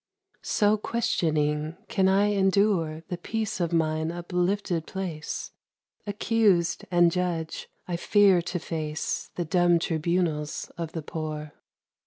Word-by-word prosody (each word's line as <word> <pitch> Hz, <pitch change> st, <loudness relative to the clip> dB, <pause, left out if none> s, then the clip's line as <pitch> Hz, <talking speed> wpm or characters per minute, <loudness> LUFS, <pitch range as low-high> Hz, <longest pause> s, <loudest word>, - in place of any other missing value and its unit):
So 210 Hz, 0 st, +2 dB
questioning, 155 Hz, -8 st, 0 dB
can 190 Hz, -3 st, +2 dB
I 200 Hz, +2 st, +4 dB
endure 190 Hz, -5 st, +2 dB
The 175 Hz, -, -4 dB
peace 220 Hz, +1 st, -3 dB
of 170 Hz, -1 st, 0 dB
mine 160 Hz, -1 st, +1 dB
uplifted 175 Hz, 0 st, -1 dB
place? 175 Hz, -6 st, -5 dB, 0.6 s
Accused 205 Hz, -4 st, +2 dB
and 175 Hz, -1 st, +4 dB
judge, 170 Hz, -3 st, -2 dB, 0.2 s
I 175 Hz, -2 st, -2 dB
fear 195 Hz, 0 st, +4 dB
to 180 Hz, +1 st, -3 dB
face 160 Hz, -2 st, -3 dB
The 175 Hz, -, -2 dB
dumb 175 Hz, +1 st, +4 dB
tribunals 165 Hz, -2 st, -1 dB
of 165 Hz, -2 st, -5 dB
the 160 Hz, -, -4 dB
poor. 155 Hz, -1 st, -5 dB
175 Hz, 120 wpm, -27 LUFS, 160-190 Hz, 0.6 s, I